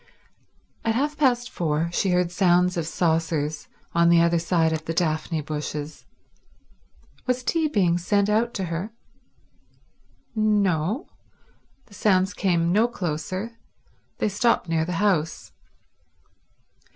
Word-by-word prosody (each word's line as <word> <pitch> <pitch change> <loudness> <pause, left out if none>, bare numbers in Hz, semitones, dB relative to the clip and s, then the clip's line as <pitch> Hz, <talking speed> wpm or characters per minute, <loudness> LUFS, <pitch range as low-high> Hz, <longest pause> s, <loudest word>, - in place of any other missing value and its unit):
At 225 0 0
half 290 +4 0
past 250 -4 +1
four 165 0 -1
she 190 - +1
heard 180 -1 +1
sounds 180 0 +3
of 165 -2 -2
saucers 160 -3 -1 0.3
on 170 0 +4
the 170 0 +6
other 170 0 +3
side 165 -1 +1
of 160 0 -4
the 165 - -3
daphne 160 -1 0
bushes. 150 0 -5 1.2
Was 250 0 0
tea 320 +5 +1
being 180 - +2
sent 200 +3 +1
out 220 +3 +1
to 195 - -2
her? 190 +7 -4 1.4
No; 205 - +1 0.8
the 215 - -20
sounds 190 -1 +2
came 170 -4 +1
no 215 +5 +4
closer, 185 +3 -4 0.6
they - - 0
stopped 220 -1 +1
near 165 -1 0
the 180 - -3
house. 165 -4 0
180 Hz, 125 wpm, -24 LUFS, 165-210 Hz, 1.4 s, the